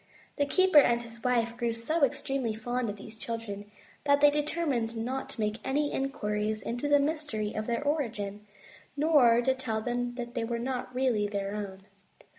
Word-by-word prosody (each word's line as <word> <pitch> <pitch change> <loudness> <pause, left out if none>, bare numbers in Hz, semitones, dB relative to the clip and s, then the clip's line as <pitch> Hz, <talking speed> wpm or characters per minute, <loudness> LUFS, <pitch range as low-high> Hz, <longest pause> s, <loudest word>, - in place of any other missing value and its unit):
The 285 -1 +2
keeper 370 0 +6
and 240 -3 +3
his 230 0 -12
wife 235 -2 +1
grew 235 -1 -1
so 285 +8 0
extremely 270 -4 0
fond 240 +1 -2
of 205 - -4
these 220 +2 -11
children, 215 -2 -5 0.4
that 285 0 +5
they 290 0 +7
determined 290 -6 -1
not 255 +4 -3
to - - -10
make 215 +1 -1
any 290 +2 0
inquiries 215 -6 -1
into 245 +5 -2
the 290 - +6
mystery 285 -8 -1
of 215 0 -3
their 235 +3 -1
origin, 210 -9 -2 0.5
nor 270 -6 +5
to 265 - +3
tell 255 -4 -2
them 245 +1 -2
that 240 -1 -5
they 240 -3 -1
were 235 +1 -2
not 250 +1 -3
really 245 -5 +2
their 200 -1 -3
own. 195 -2 -6
240 Hz, 180 wpm, -29 LUFS, 220-275 Hz, 0.5 s, they